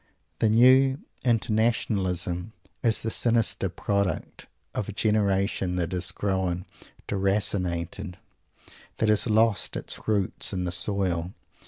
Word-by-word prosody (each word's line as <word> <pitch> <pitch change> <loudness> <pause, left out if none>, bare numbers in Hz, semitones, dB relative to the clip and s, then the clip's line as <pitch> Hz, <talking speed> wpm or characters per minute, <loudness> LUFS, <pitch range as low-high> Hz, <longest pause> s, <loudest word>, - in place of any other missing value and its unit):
The 110 - +3
new 130 +4 +5 0.3
"inter 115 -3 +1
nationalism" 95 -4 0 0.3
is 115 -2 +2
the 110 - -2
sinister 115 -5 +2
product 100 +2 -3 0.3
of 105 - -3
a - - -5
generation 100 -3 0
that 90 -1 -2
has 90 0 0
grown 95 -2 -2 0.4
"deracinated," 95 -2 -1 0.8
that 110 - +1
has 105 +2 +3
lost 110 -1 +2
its - - -4
roots 100 -2 0
in 90 -1 -2
the 90 - -2
soil. 90 -1 0
100 Hz, 120 wpm, -26 LUFS, 90-110 Hz, 0.8 s, new